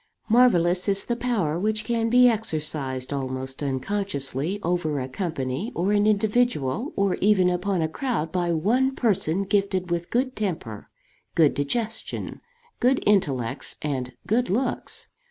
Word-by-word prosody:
Marvellous 185 -6 +4
is 195 0 +2
the 240 - -1
power 210 -11 -1
which 215 +2 -1
can 230 0 0
be 250 +1 +6
exercised, 155 - -1
almost 130 0 -4
unconsciously, 145 +2 -2
over 165 -4 0
a 130 - -3
company, 160 - -3
or 185 +4 0
an 210 0 +3
individual, 215 - +1
or 200 -2 +1
even 190 -3 +3
upon 180 -1 0
a - - +1
crowd 165 - -2
by 175 -2 0
one 240 +11 +1
person 195 -5 +1
gifted 190 -2 0
with 170 0 -2
good 255 +2 0
temper, 160 - -4 0.5
good 155 -4 +4
digestion, 215 +11 -2 0.4
good 255 +2 +2
intellects, 140 - +1
and 130 -4 -3
good 240 +4 +1
looks. 245 +6 -2
185 Hz, 135 wpm, -25 LUFS, 150-220 Hz, 0.5 s, be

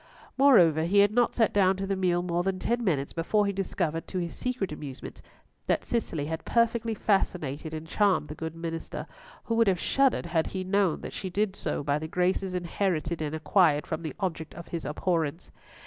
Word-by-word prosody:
Moreover, 180 - +6
he 195 +4 +1
had 200 0 +6
not 240 +2 +2
sat 225 -2 +2
down 195 -2 +4
to 195 - -3
the 195 0 -1
meal 175 -2 +1
more 175 -1 0
than 190 +1 -1
ten 240 +5 -1
minutes 145 -9 0
before 205 +5 +1
he 200 - 0
discovered, 175 -4 -2
to 185 - -5
his 170 -2 -2
secret 250 -8 -3
amusement, 145 -3 -8 0.5
that - - +1
Cicely 170 -11 -2
had 160 +1 -4
perfectly 230 -1 +1
fascinated 165 -8 -1
and 155 +1 -7
charmed 195 -4 +2
the - - -4
good 160 +1 -6
minister, 165 -1 -5 0.4
who 230 - -2
would 230 -1 +3
have 185 -3 +2
shuddered 270 -8 +2
had 165 -1 0
he 190 -1 -4
known 190 -3 +1
that - - -7
she 190 - -5
did 200 +1 0
so - - -3
by 145 +1 0
the 160 - -5
graces 180 +2 0
inherited 170 -2 -1
and 155 0 -2
acquired 160 -2 +3
from 155 - -4
the 160 -2 -5
object 165 -5 -3
of 170 +1 -10
his 170 -2 -4
abhorrence. 165 0 -1
180 Hz, 200 wpm, -28 LUFS, 160-200 Hz, 0.5 s, Moreover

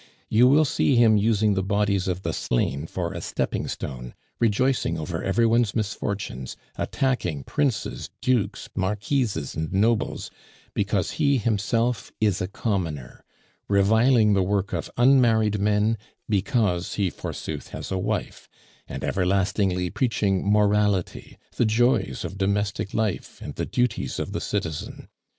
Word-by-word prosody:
You 120 +3 +5
will 150 +4 +5
see 140 -1 +2
him 115 -2 +6
using 105 0 +3
the 95 - 0
bodies 100 -1 0
of 90 0 -2
the - - -2
slain 70 +5 -1
for 85 -1 -3
a - - -5
stepping - - -2
stone, 60 -2 -6 0.2
rejoicing 115 -5 +1
over 80 +1 -4
every 115 +5 +2
one's 115 -2 +2
misfortunes, 100 - -3 0.2
attacking 120 - -1
princes, 140 - -2
dukes, 125 -5 0
marquises, 100 - -1
and 80 0 -3
nobles, 110 +4 0 0.4
because - - 0
he 140 -2 +4
himself 115 0 0
is 105 -4 +1
a 90 - -1
commoner; 85 - -3 0.4
reviling 110 +3 +4
the 100 - +3
work 100 +1 0
of - - -3
unmarried 115 -5 +4
men 105 +2 +2 0.3
because 100 -3 0
he 100 -4 0
forsooth - - -6
has - - -7
a 95 - 0
wife; 105 +3 -3 0.4
and - - -6
everlastingly 95 -1 +1
preaching 105 -6 0
morality, 105 -2 +1 0.2
the 120 - +3
joys 110 - +1
of 95 - -7
domestic 100 0 -1
life, 110 -3 -2
and - - -7
the - - -3
duties 120 - -1
of - - -3
the - - -3
citizen. 80 -2 -4
105 Hz, 135 wpm, -25 LUFS, 95-115 Hz, 0.4 s, him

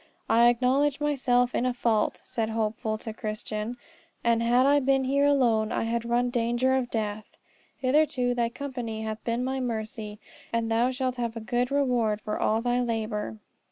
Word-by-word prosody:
"I 235 +1 +5
acknowledge 260 +4 +2
myself 250 -4 +2
in - - 0
a 250 -1 0
fault," 225 -3 0
said 225 -2 -2
Hopeful 220 0 -2
to 220 0 -7
Christian, 215 +1 -4 0.5
"and 235 -1 +3
had 240 +2 +3
I 285 +1 +5
been 270 0 +2
here 280 +2 +2
alone 235 -6 +2
I - - 0
had 235 +1 -2
run 240 +1 +2
in 245 - -2
danger 240 +2 +1
of 255 -2 -1
death. 215 -2 -4 0.4
Hitherto, 260 -2 +2
thy 235 -1 0
company 240 -4 -5
hath 220 0 -5
been 235 +1 -1
my 265 +1 -2
mercy, 220 -3 -4 0.3
and 230 -1 -1
thou 235 +2 +3
shalt 255 -1 -2
have 235 -1 -3
a - - -3
good 240 +2 -1
reward 245 -7 +1
for 210 0 -4
all 220 +1 +1
thy 245 0 +1
labour." 215 - -2
240 Hz, 180 wpm, -27 LUFS, 220-255 Hz, 0.5 s, I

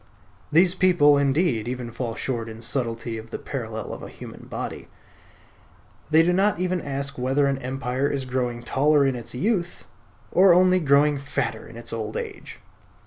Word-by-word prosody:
These 175 +3 +5
people, 175 -6 +5
indeed, 140 -4 +1
even 125 -1 -4
fall 115 -1 -4
short 115 -3 -3
in 110 +1 -10
subtlety 115 -2 -3
of 110 +1 -11
the - - -4
parallel 110 -5 -5
of - - -8
a - - -8
human - - -11
body. - - -5 1.2
They 160 +1 +6
do 175 +2 +2
not 195 0 +2
even 180 -1 0
ask 140 -1 -3
whether 135 +3 +2
an 135 -1 0
empire 130 +1 -2
is 135 -2 -2
growing 125 -2 -2
taller 145 +3 +3
in 135 -1 +1
its 120 0 -7
youth, 180 - -1 0.5
or 185 0 +6
only 185 0 +5
growing 145 -1 +3
fatter 135 -5 -3
in 115 - -12
its 120 - -8
old 110 -1 -4
age. - - -7
135 Hz, 170 wpm, -24 LUFS, 120-155 Hz, 1.2 s, They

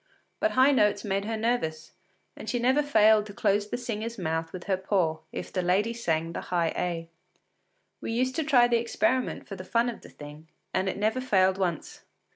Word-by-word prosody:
But 325 - +1
high 260 +2 +6
notes 210 -6 +2
made 200 0 -1
her 225 +1 -2
nervous, 215 -9 -2 0.4
and - - -8
she 245 - 0
never 260 +4 +3
failed 220 -6 +4
to 205 - -11
close 205 -1 +1
the 245 - -2
singer’s 230 -1 -4
mouth 165 -2 -2
with 180 -1 -7
her 195 - 0
paw 185 -4 0
if - - -7
the 185 - 0
lady 195 +6 +1
sang 165 -7 -1
the - - -4
high 170 -2 0
A. 170 -2 -2 0.9
We - - -4
used 255 +3 0
to 320 - +1
try 255 -5 +5
the 240 -1 +3
experiment 255 +2 -1
for 195 - -6
the 185 - -8
fun 230 +5 +1
of 235 - -7
the - - -13
thing, 150 +2 -12 0.3
and 190 +1 +1
it - - -4
never 220 +5 0
failed 190 -6 +2
once. 175 -5 -3
210 Hz, 205 wpm, -27 LUFS, 180-240 Hz, 0.9 s, high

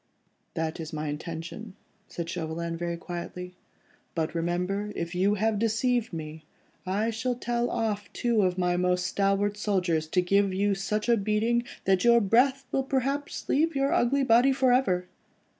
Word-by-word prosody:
"That 160 0 -2
is 160 -1 -6
my 155 -1 -3
intention," 170 +6 -6 0.3
said 170 -1 -5
Chauvelin 165 0 -3
very 170 0 -3
quietly, 180 +1 -6 0.6
"but 160 -1 -1
remember, 180 +5 -1
if 170 0 -4
you 195 +3 +2
have 215 0 +1
deceived 230 +1 +1
me, 155 -1 -7 0.4
I 210 +5 0
shall 245 +3 -2
tell 240 0 -1
off 210 -5 -2
two 235 -3 +1
of 185 -1 +1
my 180 -1 +1
most 180 0 +1
stalwart 200 +2 +1
soldiers 180 -7 0
to 180 +3 +2
give 195 +1 +2
you 200 +1 +2
such 210 +3 -2
a 235 -1 +4
beating, 220 +4 +1 0.2
that 190 -1 +3
your 235 0 +6
breath 255 +6 +3
will 270 - +1
perhaps 275 +2 -2
leave 315 +2 +2
your 275 0 +1
ugly 270 +4 +2
body 245 +2 +5
for 260 -2 +3
ever. 185 -9 +1
200 Hz, 160 wpm, -27 LUFS, 175-235 Hz, 0.6 s, your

